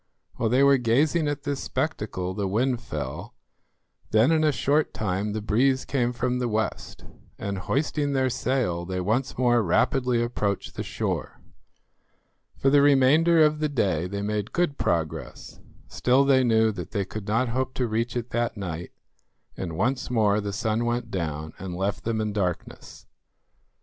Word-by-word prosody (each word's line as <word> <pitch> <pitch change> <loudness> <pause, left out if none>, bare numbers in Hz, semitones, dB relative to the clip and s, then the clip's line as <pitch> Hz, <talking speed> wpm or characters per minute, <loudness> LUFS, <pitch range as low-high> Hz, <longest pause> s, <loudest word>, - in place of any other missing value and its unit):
While 115 - 0
they 130 +4 +4
were 140 -1 +5
gazing 145 +7 +2
at 145 -1 -3
this 140 -1 -2
spectacle 105 - -3
the 100 0 -2
wind 120 +5 0
fell; - - -6 0.7
then 110 +7 +4
in 160 -1 +3
a 155 - +4
short 145 +2 +1
time 105 0 -2
the 110 -1 -4
breeze 130 +5 +2
came 125 -3 0
from 125 +1 -1
the 125 - 0
west, 110 -2 -3 0.3
and 100 -1 -4
hoisting 145 - -1
their 130 -1 +1
sail 120 -9 -1
they 90 +1 -3
once 110 +8 -1
more 120 -1 +3
rapidly 120 +6 +1
approached 105 -4 -2
the - - -5
shore. - - -3 1.2
For 135 - +2
the 145 0 +6
remainder 145 +4 +5
of 150 0 +2
the 155 -1 0
day 95 - 0
they 100 +2 -4
made 105 0 -2
good 175 -5 0
progress; 85 -9 -3 0.3
still 130 +3 +2
they 135 -1 +4
knew 110 -2 +3
that 105 - -7
they 100 -3 -2
could 110 +1 -7
not 115 +4 +1
hope 130 +1 -2
to 125 - 0
reach 115 +3 -1
it 120 0 -5
that 120 -1 -1
night, 85 -3 -5 0.6
and 85 -4 -5
once 130 +6 0
more 105 -3 +2
the 100 0 -3
sun 110 +3 -1
went 120 -1 -2
down 80 -4 -4
and 90 -1 -5
left 100 +2 -2
them 115 -1 -1
in 105 -1 -2
darkness. 90 -4 -4
120 Hz, 170 wpm, -25 LUFS, 100-135 Hz, 1.2 s, the